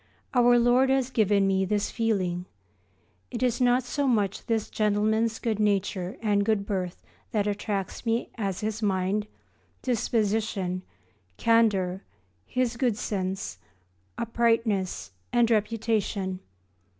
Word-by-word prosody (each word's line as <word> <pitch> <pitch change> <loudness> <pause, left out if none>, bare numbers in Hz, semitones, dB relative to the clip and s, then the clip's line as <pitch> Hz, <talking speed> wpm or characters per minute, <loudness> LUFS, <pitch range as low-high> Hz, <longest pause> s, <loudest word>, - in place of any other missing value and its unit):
Our 245 -1 +5
Lord 245 +2 +4
has 265 -1 +1
given 205 -4 +3
me 190 0 +2
this 205 +2 0
feeling. 185 -6 -1 0.8
It - - -3
is 245 0 +1
not 250 +1 +4
so 280 +3 -1
much 210 -5 0
this 225 -2 0
gentleman's 215 +2 +1
good 220 -3 -2
nature 200 -2 0
and 205 -2 +2
good 205 -2 +1
birth 185 -3 -3 0.3
that 210 -2 +1
attracts 205 -1 -3
me 230 0 -1
as 195 -5 -3
his 215 +1 -2
mind, 200 +1 0 0.6
disposition, 215 -6 0 0.6
candour, 200 -5 +2 0.5
his 245 -2 -1
good 240 -4 +1
sense, 190 - -3 0.6
uprightness, 230 - 0 0.2
and 240 -1 +3
reputation. 210 -3 0
215 Hz, 115 wpm, -27 LUFS, 195-230 Hz, 0.8 s, Our